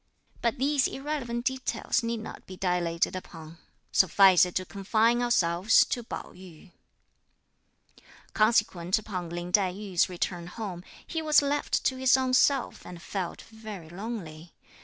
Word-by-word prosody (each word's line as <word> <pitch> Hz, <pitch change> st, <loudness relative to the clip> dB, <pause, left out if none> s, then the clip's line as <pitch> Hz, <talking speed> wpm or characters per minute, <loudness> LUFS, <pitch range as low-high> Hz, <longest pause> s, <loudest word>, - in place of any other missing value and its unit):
But 235 Hz, +3 st, 0 dB
these 275 Hz, +1 st, +2 dB
irrelevant 265 Hz, -4 st, -4 dB
details 260 Hz, -1 st, -1 dB
need 230 Hz, -1 st, -3 dB
not 220 Hz, -, -10 dB
be 185 Hz, -, -9 dB
dilated 175 Hz, -2 st, 0 dB
upon; 165 Hz, -3 st, -10 dB, 0.3 s
suffice 190 Hz, 0 st, +5 dB
it 180 Hz, -, -10 dB
to 185 Hz, -, -1 dB
confine 220 Hz, +5 st, +1 dB
ourselves 190 Hz, -4 st, +3 dB
to 245 Hz, -, -3 dB
Pao 230 Hz, -, -7 dB
yü. 180 Hz, 0 st, -14 dB, 1.6 s
Consequent 210 Hz, -5 st, +2 dB
upon 185 Hz, -5 st, -5 dB
Lin 175 Hz, +1 st, -5 dB
Tai 190 Hz, -1 st, +3 dB
yü's 190 Hz, -3 st, 0 dB
return 175 Hz, -1 st, -3 dB
home, 185 Hz, -3 st, -6 dB, 0.2 s
he 325 Hz, -, -3 dB
was 305 Hz, -2 st, +4 dB
left 285 Hz, +1 st, 0 dB
to 260 Hz, -, +1 dB
his 260 Hz, 0 st, +4 dB
own 260 Hz, -1 st, -1 dB
self 265 Hz, 0 st, +2 dB
and 175 Hz, -1 st, -10 dB
felt 180 Hz, 0 st, -5 dB
very 215 Hz, -7 st, -10 dB
lonely. 175 Hz, -5 st, -7 dB
200 Hz, 140 wpm, -28 LUFS, 175-240 Hz, 1.6 s, suffice